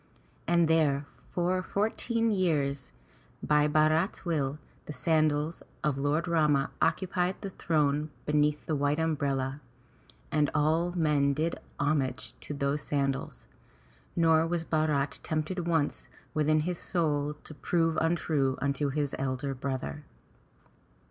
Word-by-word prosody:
And 170 -1 +4
there 150 -3 +2 0.2
for 180 +1 0
fourteen 225 +3 0
years 145 - 0 0.5
by 150 0 +3
Bharat's 155 +6 +2
will, 150 -4 0 0.3
the 150 - -5
sandals 155 +2 +1 0.2
of 150 -3 +1
Lord 150 +4 0
Rama 150 -5 +2
occupied 185 0 +1
the 195 - -5
throne 150 -3 0 0.2
beneath 150 0 +1
the 155 - 0
white 145 +1 +1
umbrella, 140 -4 -1 0.7
and 150 -1 +2
all 160 +4 +2
men 150 -5 +2
did 160 +3 -1 0.2
homage 145 -3 0
to 145 - -6
those 140 +1 0
sandals, 140 -2 -2 0.7
nor 165 -1 +4
was 170 -1 -1
Bharat 150 -4 0
tempted 165 +3 -2
once 160 -4 0 0.2
within 155 0 +2
his 175 +2 -2
soul 150 -4 0
to 150 - -12
prove 165 +1 0
untrue 155 -5 +1
unto 140 +1 0
his 145 0 -1
elder 135 +1 -2
brother. 135 +2 -4
150 Hz, 120 wpm, -29 LUFS, 145-165 Hz, 0.7 s, And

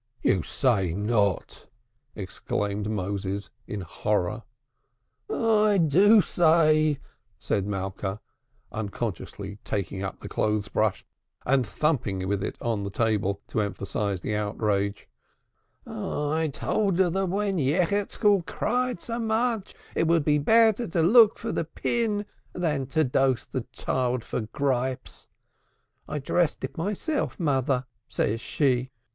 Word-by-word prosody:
"You 95 - +3
say 95 - +1
not!" 105 -2 0 0.5
exclaimed 100 +1 -3
Moses 100 -1 -3 0.2
in 105 -2 -4
horror. 105 +4 -1 0.9
"I 215 -2 +3
do 190 +7 +6
say," 155 -4 +4 0.4
said 100 0 -1
Malka, 95 0 -3 0.5
unconsciously 105 -1 -5
taking 95 -1 -3
up 95 0 -4
the - - -9
clothes 105 -2 0
brush 105 -3 0 0.4
and 135 0 +3
thumping 105 -13 0
with 100 0 -1
it - - -4
on 115 -3 0
the 100 - -3
table 100 -2 0
to 110 - 0
emphasize 100 -1 -2
the 105 - -2
outrage. 105 -1 -1 0.8
"I 155 +2 -2
told 195 +5 0
her 185 -2 +3
that 195 +2 0
when 195 0 0
Yechezkel 190 - +2
cried 250 0 -1
so 230 0 -4
much, 225 -2 0 0.2
it 165 - +2
would 165 -3 +3
be 150 -1 +3
better 225 +6 +4
to 165 -1 +1
look 220 +4 +7
for - - -4
the - - -1
pin 215 -3 -1 0.3
than 150 -7 -1
to 155 +4 +2
dose 130 -1 +1
the 130 -2 -4
child 125 +1 -1
for - - -3
gripes. 130 +3 -2 0.8
'I 150 - -3
dressed 155 +3 0
it - - -4
myself, 205 - -2
Mother,' 135 -5 +1 0.2
says 115 +2 -1
she. 130 -3 +1
130 Hz, 125 wpm, -26 LUFS, -, 0.9 s, look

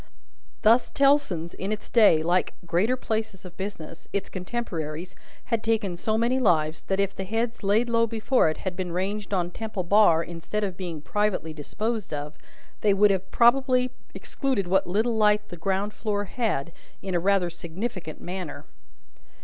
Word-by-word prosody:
Thus, 230 +3 +5
Tellson's, 275 - +2
in 195 +2 -4
its 215 - -4
day, 205 -9 +5
like 175 +2 +1
greater 185 +9 +1
places 220 -5 -3
of 175 -1 -10
business, 185 -5 -7
its 200 - -2
contemporaries, 180 -5 -4 0.4
had 225 - +1
taken 215 -5 0
so 215 +5 0
many 240 +3 +2
lives, 160 -8 +2
that, 195 0 0
if 200 -1 0
the 190 - -4
heads 225 +4 -2
laid 210 +4 +2
low 230 -1 +2
before 225 -3 +2
it 155 - -3
had 185 -2 -4
been 180 -1 -3
ranged 200 +3 -2
on 180 -3 0
Temple 215 -2 -4
Bar 175 -3 +5
instead 170 +6 -4
of 190 -3 -2
being 175 -5 -5
privately 205 -6 -1
disposed 210 +6 -3
of, 145 +1 -6 0.5
they 205 -2 +3
would 195 -2 +3
probably 255 +1 +4
have 250 - -4 0.2
excluded 265 -9 -2
what 190 +2 +2
little 220 +6 +1
light 210 -1 +3
the - - -7
ground 195 +4 -1
floor 205 -2 -2
had, 200 - -2 0.3
in 190 - -3
a 175 - +2
rather 185 -1 +2
significant 175 0 -5
manner. 180 -3 -6
200 Hz, 165 wpm, -26 LUFS, 175-220 Hz, 0.5 s, Thus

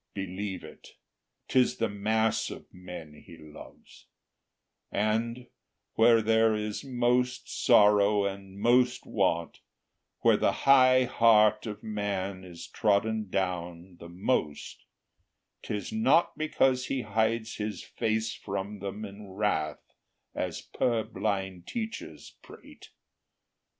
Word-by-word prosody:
Believe 95 0 -5
it, - - -14 0.5
'tis 130 -1 +2
the 115 - +1
mass 110 +2 0
of - - -9
men 90 -4 -10
He 85 - -14
loves; 75 -1 -15 0.8
And, 115 +4 -1 0.5
where 115 0 +5
there 110 0 +3
is 105 +2 -4
most 125 -1 0
sorrow 105 0 +4
and 100 0 -6
most 125 +2 +3
want, 85 0 -1 0.6
Where - - +5
the - - +2
high 130 -2 +6
heart 110 -2 +4
of 105 -1 -7
man 100 -3 -3
is 85 -2 -10
trodden 110 0 0
down 90 -1 -3
The 85 - -10
most, 85 - -2 0.8
'tis 105 -1 -5
not 220 -6 +3
because 135 -4 +1
He 135 - -1
hides 110 +2 -1
his 105 0 -4
face 110 0 -2
From 100 +1 -5
them 100 +2 -5
in 100 0 -11
wrath, 95 -6 -1 0.5
as - - -4
purblind 100 -6 -2
teachers 225 -1 -6
prate. - - -15
105 Hz, 110 wpm, -28 LUFS, 95-115 Hz, 0.8 s, high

